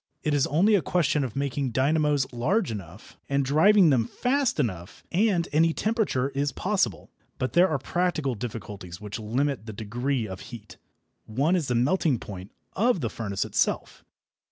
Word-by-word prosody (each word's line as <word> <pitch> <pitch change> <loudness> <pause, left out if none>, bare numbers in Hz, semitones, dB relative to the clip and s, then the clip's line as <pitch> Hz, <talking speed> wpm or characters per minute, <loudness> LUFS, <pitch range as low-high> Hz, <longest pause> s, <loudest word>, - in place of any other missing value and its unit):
It 150 - 0
is 145 -2 +2
only 185 +9 +3
a 200 - +4
question 155 -1 +1
of 125 -5 -5
making 140 -2 -2
dynamos 145 +1 +2
large 165 - 0
enough, 100 -1 -9
and 140 0 +1
driving 170 +5 +5
them 120 -4 +2
fast 260 - 0
enough, 90 - -3
and 185 -2 +2
any 160 +2 +4
temperature 210 - 0
is 140 +1 -1
possible. 185 - -1 0.3
But 130 -2 -2
there 180 +3 +5
are 155 - 0
practical 155 -1 -1
difficulties 105 -6 -7
which 105 +2 -6
limit 120 +2 -1
the 110 - -6
degree 120 +3 -2
of 95 -1 -7
heat. 110 0 -11 0.5
One 140 +11 +1
is 165 -6 -1
the 125 - 0
melting 140 +2 +2
point 95 -2 -9 0.2
of 225 -3 +2
the 115 - -2
furnace 100 -4 -3
itself. - - -1
140 Hz, 165 wpm, -26 LUFS, 115-170 Hz, 0.5 s, driving